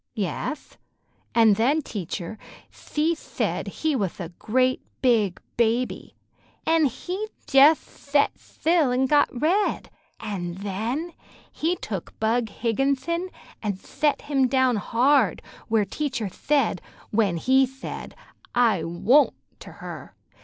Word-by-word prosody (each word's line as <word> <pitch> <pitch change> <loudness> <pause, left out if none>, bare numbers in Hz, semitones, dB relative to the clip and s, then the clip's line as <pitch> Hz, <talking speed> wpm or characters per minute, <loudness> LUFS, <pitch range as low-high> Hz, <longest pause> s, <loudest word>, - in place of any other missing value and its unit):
"Yeth, 220 - -4 0.6
an' 225 -2 +6
then 270 +9 +2
teatcher, 190 -1 -5 0.3
thshe 315 +3 -1
thaid - - -3
he 315 -2 -1
wath 200 -7 -2
a 170 -3 -5
great 255 +8 0 0.2
big 220 -7 +3 0.2
baby, 235 +2 0 0.5
an' 325 -1 +4
he 360 - -3 0.2
jeth 285 +4 +7
thet 285 0 0
thtill 320 -5 0
an' 255 +2 +2
got 290 +2 +4
red, 330 +11 0 0.3
an' 180 -5 -4
then 220 - -3 0.4
he 335 +3 0
took 195 - -6
Bug 225 +2 +1
Higginthon 275 - -1 0.3
an' 210 -2 -1
thet 285 +10 -1
him 275 -3 +2
down 255 -2 +2
hard 240 - +3 0.3
where 220 -2 +2
teacher 250 0 -3
thaid, 250 - 0 0.3
when 205 -5 +2
he'd 265 +8 +4
thaid, 265 +1 -8 0.4
'I 220 -9 +3
won't' 225 - +3 0.2
to - - -11
her. - - -9
250 Hz, 120 wpm, -25 LUFS, 210-290 Hz, 0.6 s, jeth